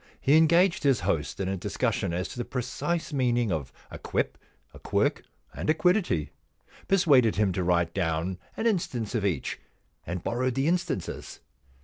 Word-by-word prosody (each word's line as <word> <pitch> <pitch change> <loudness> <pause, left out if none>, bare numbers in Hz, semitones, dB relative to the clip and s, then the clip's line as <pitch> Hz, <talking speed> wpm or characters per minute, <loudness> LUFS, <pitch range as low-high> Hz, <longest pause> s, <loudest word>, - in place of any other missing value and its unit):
He 140 - +4
engaged 170 +3 +4
his 135 -6 +3
host - - -1
in 95 - -1
a 95 - -1
discussion 90 - -1
as 90 +1 -2
to - - -8
the - - 0
precise 135 +7 -3
meaning 120 -5 +1
of 70 -6 -3 0.2
a - - -8
quip, - - -1 0.4
a - - -12
quirk, - - 0 0.3
and - - -4
a 155 - +4
quiddity, 175 - +1 0.6
persuaded 140 - +4
him 105 -2 +2
to 90 - -1
write 85 -1 +1
down 90 0 -1 0.2
an 220 - -2
instance 150 - 0
of 115 -4 0
each, 90 -10 -1 0.5
and 85 +1 -4
borrowed 125 +1 -1
the 135 +2 +1
instances. 170 - -2
120 Hz, 165 wpm, -27 LUFS, -, 0.6 s, He